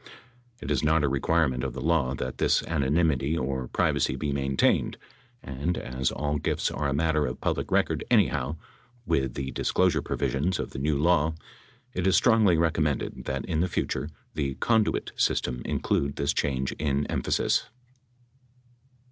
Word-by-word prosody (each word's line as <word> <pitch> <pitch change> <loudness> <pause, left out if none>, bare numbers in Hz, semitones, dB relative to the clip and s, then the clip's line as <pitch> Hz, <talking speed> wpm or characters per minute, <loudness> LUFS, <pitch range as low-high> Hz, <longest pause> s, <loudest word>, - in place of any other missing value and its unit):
It - - -4
is 70 - +1
not 80 0 +3
a - - +3
require 80 +4 +2
ment 65 -1 -3
of 65 -3 -3
the 65 - -6
law 70 -3 +1
that 65 0 -5
this - - +3
anonymity 75 -1 +1
or 65 -1 -2
privacy - - +1
be 75 -2 -2
maintained, 70 -1 +1 0.5
and 70 +7 -2
as 65 +1 -2
all 75 0 -2
gifts - - -1
are 75 -2 -1
a - - -1
matter 75 0 +1
of 60 - -5
public - - -1
record - - +1
anyhow 70 +5 +2 0.5
with 65 - 0
the 65 -1 -3
disclosure - - +1
provisions 80 +7 -1
of - - -4
the 65 - -6
new 75 +1 +1
law 80 0 +2 0.6
it 90 +1 -1
is 95 - +4
strongly 110 -7 +5
recom 80 -1 +1
mended 75 -3 -3
that 70 0 -3
in 80 -3 -1
the 90 +2 +1
future 75 - -2 0.2
the 70 -3 -2
"conduit" 110 - +1
system 60 -1 0
include 70 0 0
this 70 +1 0
change 65 -1 -1
in 70 -1 0
emphasis. - - 0
70 Hz, 165 wpm, -27 LUFS, 65-80 Hz, 0.6 s, strongly